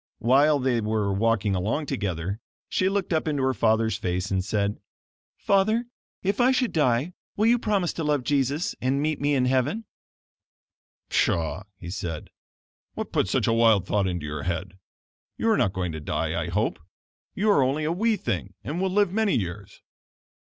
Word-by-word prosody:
While 140 +6 +4
they 125 -3 +1
were 105 -2 0
walking 105 -1 +1
along 105 +11 -1
together, 100 - -3 0.3
she 185 - +1
looked 195 -2 -1
up 160 0 0
into 145 -3 0
her 130 0 +2
father's 110 -2 +2
face, 90 -1 -2
and 95 -1 +1
said: 100 0 -1 0.6
"Father, 215 +4 +2 0.4
if 200 +4 +1
I 245 - +5
should 255 -5 +1
die, 145 +2 +1 0.2
will 215 - +2
you 240 +1 +4
promise 200 -6 0
to 165 - -4
love 150 -3 +1
Jesus 140 +4 0
and 130 +2 +1
meet 150 0 -1
me 145 0 +2
in 130 -2 +2
heaven?" 135 - 0 1.2
"Pshaw!" 85 +4 0
he 85 -2 -8
said, 85 -5 -5 0.6
"what - - -5
put - - +1
such - - +1
a 115 - +2
wild 115 -4 +4
thought 100 0 +1
into 90 -4 -3
your 75 0 -4
head? 85 +3 -4 0.6
You 225 - +2
are 215 - +3
not 95 - +2
going 90 -3 -3
to 80 - -5
die, 75 - -2
I - - -5
hope. - - -1 0.6
You 210 +2 +2
are 200 - +4
only 135 +4 +1
a 155 - 0
wee 220 +6 +2
thing 100 - -3
and 155 +7 -3
will 190 - +1
live 200 -1 +2
many 220 -2 +2
years." 95 -1 -6
130 Hz, 180 wpm, -25 LUFS, -, 1.2 s, I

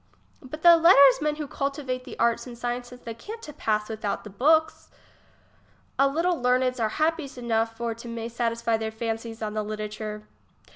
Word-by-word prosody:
Butthc 320 +5 +5
letter'smcn 300 -2 +6
whocultivatethcartsand 260 -5 -2
the 245 -2 -9
sciences 245 +1 -5
they 230 - -6
can't 425 - -9
to 300 - -8
pass 215 -6 -1
without 215 -2 -3
the 210 - -10
books. 315 +9 +2 1.1
A 275 - +6
little 335 +3 0
leameds 250 0 +2
are 220 -1 +1
happies 310 +1 -1
enough 225 -2 -1
for 235 0 -2
to 230 +1 -11
may 230 -1 -5
to 235 - -12
satisfy 230 -1 0
their 220 0 -3
fancies 225 0 -5
on 210 -1 -3
the 215 - -1
literature. 210 0 -5
240 Hz, 155 wpm, -26 LUFS, 225-275 Hz, 1.1 s, letter'smcn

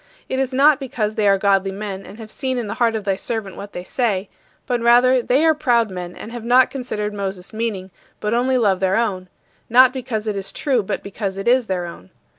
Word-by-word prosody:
It 260 - -2
is 265 -1 0
not 280 +3 +5
because 240 -6 -2
they 215 -1 +1
are 195 0 +5
godly 195 -1 +2
men 195 -1 -6
and 200 - -11
have 220 -2 -10
seen 260 -1 -2
in 240 - -2
the 205 - -4
heart 230 -1 +3
of 215 - -3
thy 195 -1 0
servant 215 -2 -4
what 200 0 -9
they 180 - -6
say, 205 -3 -1 0.4
but 245 -3 -1
rather 245 +2 +5
they 265 +6 +2
are 320 - +5
proud 240 -8 +1
men 180 -1 -6
and 225 - -9
have 240 -1 -7
not 250 +2 +4
considered 210 -6 -4
Moses' 195 -1 -5
meaning, 215 -4 -3 0.3
but 210 +1 -1
only 255 +2 +2
love 200 -6 +2
their 190 0 +1
own 190 -6 -1 0.4
not 255 +2 +6
because 230 -4 -4
it 210 - -1
is 195 -1 -4
true 260 -5 0
but 195 - -4
because 200 -1 -4
it 195 - -5
is 245 -1 +3
their 180 -2 -2
own. 95 - -10
220 Hz, 235 wpm, -20 LUFS, 195-250 Hz, 0.4 s, not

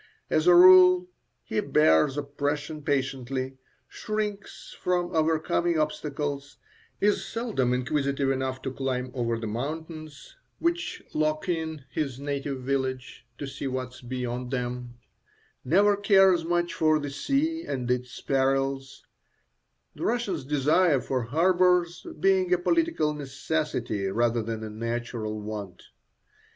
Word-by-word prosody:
As 155 +2 +2
a 175 - +8
rule, 180 0 +8 0.3
he - - -2
bears 80 - +3
oppression 145 +2 -3
patiently, 135 -2 -2 0.3
shrinks 210 -2 -5
from 175 -1 0
overcoming 160 +1 +1
obstacles, 145 -2 -3 0.4
is 205 0 +2
seldom 220 - -1
inquisitive 140 +1 0
enough 130 -1 -2
to 135 - -3
climb 130 -1 -2
over 115 -2 -1
the 115 - -5
mountains 155 +6 -6 0.2
which 340 +1 -2
lock 155 +2 0
in 160 -5 -3
his 135 -5 -3
native 140 -2 -4
village 130 -2 -3
to 145 - -5
see 140 0 -5
what 130 -1 -4
is 130 - -13
beyond 125 0 -4
them, 125 -1 -4 0.7
never 200 +8 +4
cares 195 -4 +4
much 175 +1 0
for 155 -1 +3
the 145 -2 -4
sea 290 - 0
and 125 -3 -3
its 125 0 -3
perils, 135 0 -1 0.9
the - - -8
Russian's 210 - -1
desire 150 +2 +3
for 125 -1 -2
harbours 175 +4 +2
being 190 -2 +3
a 180 - +5
political 320 - +1
necessity 135 -7 -2
rather 115 +3 +1
than 110 0 -4
a 110 - -5
natural 115 -1 -4
want. 105 -4 -7
140 Hz, 125 wpm, -27 LUFS, 125-175 Hz, 0.9 s, a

